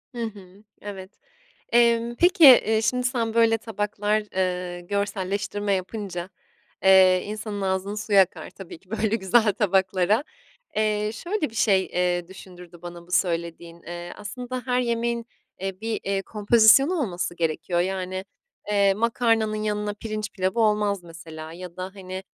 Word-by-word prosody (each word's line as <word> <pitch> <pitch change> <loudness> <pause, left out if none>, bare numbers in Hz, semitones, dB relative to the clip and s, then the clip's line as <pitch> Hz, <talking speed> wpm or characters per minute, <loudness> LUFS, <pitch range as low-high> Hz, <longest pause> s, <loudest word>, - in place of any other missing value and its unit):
Hı 235 - -3
hı, 200 -2 -9 0.2
evet. 195 -2 -8 0.6
Emm, 235 0 +3
peki, 350 +1 +4
eee, 225 -5 +7
şimdi, 250 +2 +1
sen, 230 -3 -1
böyle, 225 -1 +4
tabaklar, 210 -1 -1
eee, 180 -1 -2
görselleştirme 200 +1 -2
yapınca, 185 -2 -4 0.6
eee, 185 -1 +6
insanın 210 -1 -5
ağzının 190 +1 -1
suyu 210 -1 +1
akar 190 -1 +2
tabii 185 -4 -11
ki 185 - -29
böyle 220 0 0
güzel 215 +2 +3
tabaklara. 195 +3 +1 0.5
Eee, 215 0 +1
şöyle 345 - -3
bir - - -17
şey, 195 -4 +3
eee, 175 -1 -1
düşündürdü 180 -2 -13
bana 175 -1 -9
bu 180 - -20
söylediğin. 170 -1 -2
Eee, 175 0 -7
aslında 245 +4 -6
her 250 -1 +1
yemeğin, 235 -1 -1 0.3
eee, 195 0 -5
bir, 225 0 -3
eee, 195 0 -1
kompozisyonu 225 - +4
olması 185 - -2
gerekiyor 165 +1 -1
yani. 185 +1 -3 0.5
Eee, 200 -1 +3
makarnanın 225 0 +1
yanına 210 -1 -2
pirinç 215 0 -5
pilavı 190 +4 -1
olmaz 210 -3 +1
mesela 165 -2 -10
ya 175 0 -10
da, 185 - -4
hani, 190 -1 -7
205 Hz, 140 wpm, -24 LUFS, 185-225 Hz, 0.6 s, eee